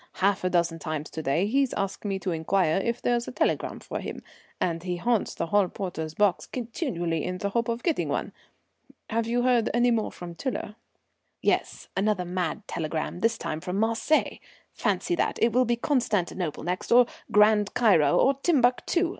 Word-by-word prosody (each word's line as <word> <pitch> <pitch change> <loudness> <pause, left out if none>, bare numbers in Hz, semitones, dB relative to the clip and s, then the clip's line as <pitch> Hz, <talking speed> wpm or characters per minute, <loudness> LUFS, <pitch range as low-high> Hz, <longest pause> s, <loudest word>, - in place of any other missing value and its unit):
Half 195 0 +1
a 185 - +2
dozen 170 -2 +1
times 155 -1 -4
to 160 - -4
day 155 +6 +1
he's 265 +4 +1
asked 195 +2 -3
me 195 -1 -1
to 190 -1 -3
inquire 165 0 +1
if 235 +1 -2
there's 240 -1 +1
a - - -4
telegram - - -1
for - - -5
him, - - -6 0.4
and 165 -2 -1
he 180 0 -3
haunts 225 +4 0
the - - -2
hall 200 +3 +3
porter's 160 -5 -5
box 205 -4 +2
continually 205 - -3
in 180 0 -3
the 200 +2 -2
hope 235 +2 0
of 235 0 -2
getting 335 -4 0
one. - - -2 0.8
Have 225 0 0
you 240 +1 +1
heard 245 -3 +3
any 240 0 +4
more 225 -2 0
from 175 -1 -8
Tiler?" 235 +1 -4 0.7
"Yes, - - -1
another 195 -2 +1
mad 180 +2 -3
telegram, 160 +1 -3
this 230 +3 +1
time 155 - -4
from 180 +2 -3
Marseilles. 230 +8 +1 0.3
Fancy 355 - 0
that! 345 - 0
It 230 - +3
will 255 +1 +4
be 240 0 +1
Constantinople 205 - -1
next 180 +2 -3
or 245 +1 +7 0.3
Grand 210 -1 +4
Cairo 165 -11 +4
or 270 - +4
Timbuctoo. 300 +4 +2
205 Hz, 180 wpm, -27 LUFS, 175-235 Hz, 0.8 s, or